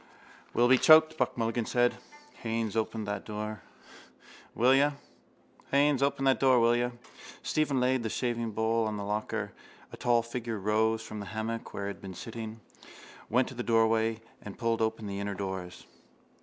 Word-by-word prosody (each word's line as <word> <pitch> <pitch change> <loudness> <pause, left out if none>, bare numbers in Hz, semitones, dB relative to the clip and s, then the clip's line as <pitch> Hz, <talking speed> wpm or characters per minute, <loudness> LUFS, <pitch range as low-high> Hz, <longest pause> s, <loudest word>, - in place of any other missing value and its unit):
—We'll 120 - +4
be 130 0 +5
choked, 155 0 +7
Buck - - -1
Mulligan 115 0 -1
said. 120 0 +2 0.5
Haines, 115 -2 -2
open 110 -1 -1
that 105 -1 -3
door, 105 0 -5 0.9
will 125 +3 +5
you? 145 +2 +4 2.5
Stephen 150 -4 +1
laid 130 0 +2
the 115 - -2
shavingbowl 115 -1 0
on 105 -1 -3
the 100 - -4
locker. 105 +1 -3 0.4
A - - -8
tall 120 -1 +2
figure 115 -1 -4
rose 110 +2 +1
from 110 -1 -7
the 100 - -6
hammock 110 +4 -4
where 100 - -4
it - - -2
had 100 - -8
been 95 -1 -8
sitting, 110 +2 -7 0.7
went 125 +3 +2
to - - -9
the 120 - -4
doorway 115 -1 +2 0.2
and 105 - -9
pulled 115 -2 0
open 110 -1 -1
the 100 -1 -4
inner 100 0 -3
doors. 95 -2 -5
115 Hz, 150 wpm, -29 LUFS, 105-120 Hz, 2.5 s, choked